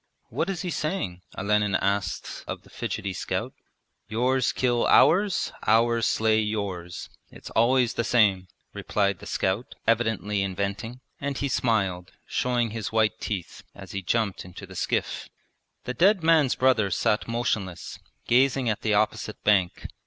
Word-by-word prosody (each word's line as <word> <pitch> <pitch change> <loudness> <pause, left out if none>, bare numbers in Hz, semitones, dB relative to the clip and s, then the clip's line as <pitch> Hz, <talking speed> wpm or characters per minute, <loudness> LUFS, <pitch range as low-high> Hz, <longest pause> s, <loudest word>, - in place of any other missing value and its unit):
'What 170 - -2
is 190 -2 -3
he 180 - -3
saying?' 150 - -3 0.2
Olenin 105 0 +1
asked 100 0 -2
of - - -5
the - - -20
fidgety 95 -1 -4
scout. - - -3 0.5
'Yours 125 +3 +1
kill 120 -2 +1
ours, 180 +8 +4 0.2
ours 115 +1 +3
slay 110 0 +2
yours. 100 -5 -4 0.2
It's - - -11
always 120 +1 +3
the 115 - -1
same,' 105 -6 +3 0.3
replied 100 -1 0
the - - -10
scout, 95 +6 -2
evidently 110 -3 +1
inventing, 100 +6 -3 0.2
and 140 -1 -3
he 140 - -1
smiled, 100 -8 0
showing 120 -3 0
his 110 -1 -4
white 110 -1 +1
teeth, 95 -6 -5
as 95 -2 -10
he 100 - -3
jumped 100 +2 -1
into 90 +2 -10
the 95 0 -13
skiff. - - -2 0.5
The 125 - -4
dead 185 - +3
man's 160 -5 +4
brother 125 -6 +3
sat 105 +3 0
motionless, 110 -6 -3 0.3
gazing 130 0 +3
at 110 +1 -2
the 110 -2 +1
opposite 110 0 -1
bank. 95 -4 +2
110 Hz, 145 wpm, -26 LUFS, 100-125 Hz, 0.5 s, ours